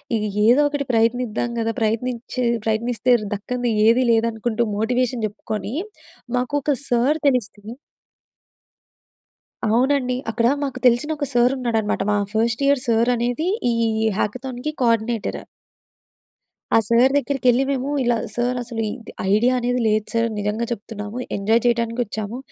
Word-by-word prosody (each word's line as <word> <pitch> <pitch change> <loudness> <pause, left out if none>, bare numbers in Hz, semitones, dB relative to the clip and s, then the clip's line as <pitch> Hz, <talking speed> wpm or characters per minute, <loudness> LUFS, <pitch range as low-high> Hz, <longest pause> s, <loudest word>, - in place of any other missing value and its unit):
ఇగ 215 - -1 0.2
ఏదో 250 +6 +5
ఒకటి 285 -1 -2
ప్రయత్నిద్దాం 235 0 +1
గదా! 225 0 0
ప్రయత్నించే 240 +3 -2 0.2
ప్రయత్నిస్తే 230 +2 0 0.2
దక్కని 245 +3 -2 0.2
ఏది 245 +3 +4
లేదనుకుంటూ, 230 0 0
మోటివేషన్ 245 +1 0
చెప్పుకొని 215 +1 -5 0.6
మాకు 250 +3 -2
ఒక 290 +1 +1
సర్ 255 +6 +2
తెలిస్తే 220 -4 -1 2.0
అవునండి. 250 +2 +2
అక్కడ 230 +1 +1 0.2
మాకు 260 -2 -4
తెలిసిన 245 +5 +4
ఒక 290 - -2
సార్ 245 +1 +4
ఉన్నాడన్నమాట. 225 -5 -1
మా 205 - +2 0.2
ఫస్ట్ 230 +4 0
ఇయర్ 280 -2 +3
సార్ 230 +1 +3
అనేది 245 +8 -1 0.2
ఈ - - +1 0.4
హ్యాకథాన్‌కి 255 +6 -3
కోర్డినేటర్. 230 -1 0 1.3
ఆ - - +7
సార్ 240 +3 +4
దగ్గరికెళ్లి 265 -2 +2
మేము 275 0 -1
ఇలా 240 -1 +2 0.2
సార్ 245 +1 -1
అసలు 230 -2 -4
ఇది 230 +1 -8 0.2
ఐడియా 240 +4 +3
అనేది 245 +1 0
లేదు 215 0 +1
సార్ 230 0 +2
నిజంగా 210 +3 -1
చెప్తున్నాము 210 0 -6 0.2
ఎంజాయ్ 220 +3 +2
చేయటానికి 235 0 +1
వచ్చాము 215 +1 -5
235 Hz, 130 wpm, -21 LUFS, 225-250 Hz, 2.0 s, ఆ